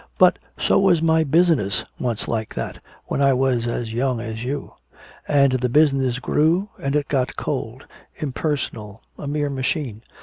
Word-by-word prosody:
But - - +5 0.2
so - - +3
was 185 -4 +4
my 160 0 +3
business 155 - +2 0.2
once 120 -4 -2
like 110 -2 -3
that, - - -4 0.3
when - - -2
I 135 -1 +5
was 125 -2 +1
as 120 -1 -3
young 125 0 0
as 115 0 -5
you. 140 +3 -4 0.5
And 140 -2 +4
the 125 -1 0
business 135 -3 +3
grew 165 +9 +1
and 140 +1 -1
it 145 -1 +1
got 130 -3 0
cold - - -4 0.3
impersonal, 125 -7 -3 0.2
a 145 - -5
mere 145 0 -1
machine. 130 -4 -2
135 Hz, 160 wpm, -22 LUFS, 120-150 Hz, 0.5 s, But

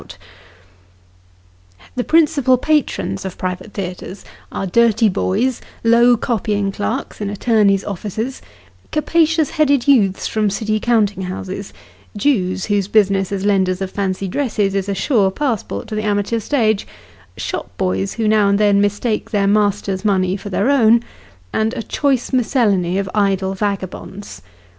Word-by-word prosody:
Stage - - -18
struck. - - -23 1.6
89 90 - -21
The 245 - -2
principal 285 -5 +3
patrons 285 -9 0
of 190 -2 -6
private 185 +3 -5
theatres 185 0 -6 0.3
are - - -3
dirty 225 +2 +3
boys, 215 +6 0 0.2
low 235 +1 +5
copying 210 -3 -1
clerks 215 +5 -4
in 205 - -2
attorneys' 205 -2 +2
offices, 215 +6 -4 0.5
capacious 320 0 +2
headed 285 -4 +2
youths 205 -9 +3
from 215 -2 0
City 215 +1 -1
count 215 -3 +2
ing 190 0 -5
houses, 190 +2 -6 0.5
Jews 190 -7 0
whose 205 -2 0
business, 195 -3 +2
as 200 0 -2
lenders 190 -2 +2
of 190 -1 -4
fancy 195 -1 -2
dresses, 210 -3 -1
is 195 0 -2
a 200 - -1
sure 200 -1 +2
passport 240 0 -3
to - - -6
the 215 - -1
amateur 210 +2 0
stage, 220 -4 0 0.5
shop - - -4
boys 95 +1 -1
who 225 -2 -1
now 210 -1 +4
and 200 0 +3
then 205 -1 +4
mistake 205 +2 -1
their 205 -3 +1
masters' 205 -1 +1
money 190 -3 +1
for 205 +1 -7
their 200 +7 +1
own; 235 -3 +4 0.5
and 220 +3 0
a 230 - -4
choice 270 -1 -1
miscellany 210 -8 +1
of 195 -1 -1
idle 195 -2 +1
vagabonds. 195 - -5
205 Hz, 150 wpm, -18 LUFS, 195-235 Hz, 1.6 s, low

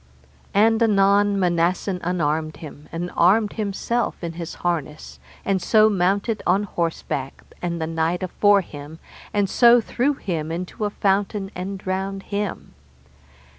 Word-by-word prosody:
And 225 +2 +4
anon 200 -1 +4
Manassen 180 +1 +1
unarmed 155 -3 -1
him, 150 -1 -11
and 175 +2 -4
armed 205 +5 +4
himself 220 +3 -1
in 170 -1 -3
his 170 -1 -6
harness, 155 -3 -3 0.3
and 195 -2 +1
so 215 +4 +5
mounted 200 +4 0
on 200 - +3
horseback, 165 -7 -3 0.2
and 170 -1 -2
the 160 - -1
knight 165 +3 -1
afore 200 +2 +3
him, 150 -2 -10 0.3
and 205 -1 +1
so 240 +4 +6
threw 255 +5 0
him 165 -9 -3
into 180 +2 -5
the 210 -1 0
fountain 200 0 0
and 190 +2 -4
drowned 190 +1 -3
him. 205 -2 -4
190 Hz, 135 wpm, -22 LUFS, 170-205 Hz, 0.3 s, so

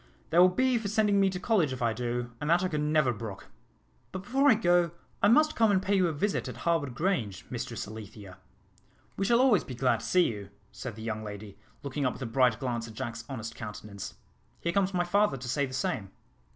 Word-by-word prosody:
They 170 - +4
will 180 +1 +8
be 255 +5 +2
for 220 - -4
sending 210 -1 +2
me 195 -1 +4
to 185 -1 -4
college 185 - +2
if 130 - -4
I 115 -1 +2
do, 120 0 -3
and 150 - -2
that 175 +2 +4
I - - +2
could 150 -3 -1
never 150 -4 +2
brook. 105 -3 -8 0.6
But 185 0 -6
before 270 +6 +3
I 250 - +7
go, 175 -4 +3 0.3
I - - +5
must 305 +8 +4
come 225 -1 +4
and 200 -2 +4
pay 200 +2 0
you 185 -2 +3
a - - 0
visit 195 +7 -1
at - - -7
Harwood 155 -7 +1
Grange, 125 - -1
Mistress 120 -3 -4
Alethea." 105 -3 -10 0.8
"We 195 - -1
shall 235 +3 +4
always 250 -7 +4
be 130 - -7
glad 125 -2 +2
to 115 - -8
see 180 +7 +4
you," 100 -3 -4 0.2
said 125 -5 -7
the 110 - -9
young 110 -1 -3
lady, 105 -1 -8 0.3
looking 140 +1 -3
up 125 - -1
with - - -12
a - - -2
bright 120 -1 +2
glance 120 -3 -2
at 110 - -11
Jack's 115 +1 -5
honest 115 -4 -5
countenance. 105 -3 -8 0.4
"Here 170 - -2
comes 195 0 +2
my 180 -2 +1
father 200 -4 +2
to 125 0 -7
say 140 +3 0
the - - -11
same." 120 -6 -2
140 Hz, 230 wpm, -29 LUFS, 115-190 Hz, 0.8 s, will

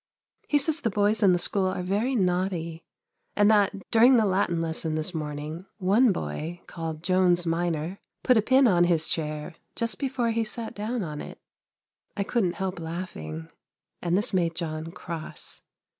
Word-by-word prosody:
He 295 - +3
says 310 +3 +2
the 230 - +1
boys 210 +2 +2
in 195 -3 +6
the 175 - +4
school 190 +2 +2
are 185 -1 -2
very 210 +8 0
naughty 180 -4 -1 0.5
and 205 +1 +5
that, 200 -2 +2
during 240 +3 +6
the 220 - +4
Latin 185 -3 +1
lesson 160 -1 -1
this 155 +3 -3
morning, 155 +3 -5
one 210 +5 +4
boy, 160 - -4
called 160 -2 -6
Jones 180 -1 +3
minor, 165 +1 -1 0.2
put 250 - +5
a 220 - +5
pin 260 +4 +5
on 175 -4 +4
his 165 -2 +2
chair, 155 +1 -2 0.2
just 230 0 -2
before 260 -4 0
he 225 0 +1
sat 220 +1 -4
down 215 +2 -3
on 150 -3 -5
it. - - -9 0.8
I 200 - +1
couldn't 195 -5 0
help 190 -2 -3
laughing; 120 - -6 0.5
and 175 +1 +1
this 210 +1 +1
made 170 -3 +1
John 160 -1 -4
cross. 165 -2 -7
180 Hz, 170 wpm, -26 LUFS, 165-215 Hz, 0.8 s, in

